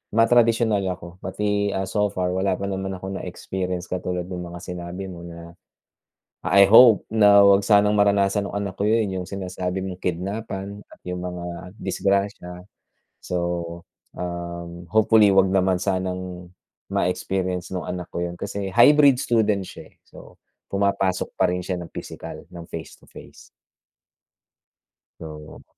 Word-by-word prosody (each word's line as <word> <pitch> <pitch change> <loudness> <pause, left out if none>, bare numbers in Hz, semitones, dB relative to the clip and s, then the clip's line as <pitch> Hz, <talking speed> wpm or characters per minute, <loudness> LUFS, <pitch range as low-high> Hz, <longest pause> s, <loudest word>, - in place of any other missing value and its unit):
matradisyonal 115 -2 +3
ako. 85 +1 -13
Pati, 100 +1 -1
ah, 95 - -1
so 105 +1 +1
far 90 -2 -2
wala 95 0 0
pa 100 - -7
naman 95 0 -3
akong 95 +1 -6
na-experience 90 0 -5
katulad 90 -1 -2
nung 90 -1 -6
mga 85 0 -8
sinabi 90 +2 -6
mo 85 - -9
na 85 0 -10 1.0
I 100 0 +6
hope 115 +1 +7
na 100 -2 +7
huwag 100 0 +5
sanang 105 0 +4
maranasan 100 0 +3
nung 100 - -4
anak 100 -2 -4
ko - - -1
yun, 105 -4 +1
yung - - -9
sinasabi 95 -1 -4
mong 90 -1 -7
kidnapan 100 +2 -4
at - - -16
yung 90 0 -4
mga 90 0 -6
disgrasya. 100 -2 -2 0.6
So, 85 -1 -3 0.4
um, 85 0 -6
hopefully 110 -1 +5
huwag 95 -1 +4
naman 95 -1 +2
sanang 90 -1 -3 0.4
ma-experience 90 0 -1
nung 90 - -4
anak 90 -1 -5
ko 85 - -2
yun. 85 - -6
Kasi 100 -1 -4
hybrid 140 +2 +6
student 110 -4 +1
siya, - - -11
eh. - - -39
So, - - -14 0.4
pumapasok 100 -2 0
pa 95 - +4
rin 90 0 -2
siya 90 0 -3
ng 85 - -10
pisikal, - - -8
ng 85 -2 -10
face 80 -1 -7
to - - -19
face. - - -14 1.7
So 75 -1 -10
95 Hz, 145 wpm, -23 LUFS, 90-100 Hz, 1.7 s, hope